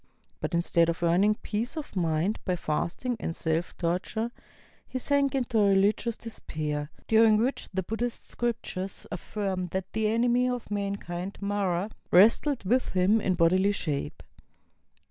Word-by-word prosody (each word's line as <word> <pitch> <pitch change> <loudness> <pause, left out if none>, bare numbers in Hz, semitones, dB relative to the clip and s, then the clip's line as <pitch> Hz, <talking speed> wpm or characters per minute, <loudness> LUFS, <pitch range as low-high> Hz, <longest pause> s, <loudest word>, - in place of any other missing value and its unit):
But - - -2
instead 170 0 +3
of 170 +1 -2
earning 190 +5 +4
peace 230 +8 -2
of 300 -8 -6
mind 170 +3 0
by 180 - 0
fasting 175 +9 -2
and 165 - -3
self 160 +2 -2
torture, 185 +7 -1 0.6
he - - -4
sank 280 +1 +1
into 245 -4 +1
a 200 -2 +5
rehgious 210 +4 +2
despair, 150 -9 -4 0.2
during 220 -1 +6
which 245 +5 -1
the 190 0 -1
Buddhist 230 +5 -4
scriptures 220 -5 -3
affirm 190 0 -3
that 190 +2 -4
the 220 -1 +1
enemy 240 +3 +2
of 245 -4 -4
mankind. 200 -2 -3
Mara, 200 -1 -1 0.2
wrestled 230 +8 +5
v^ith 245 +7 +1
him 190 +4 +3
in 185 - +1
bodily 185 +4 +3
shape. 145 - -3
200 Hz, 145 wpm, -28 LUFS, 175-230 Hz, 0.6 s, during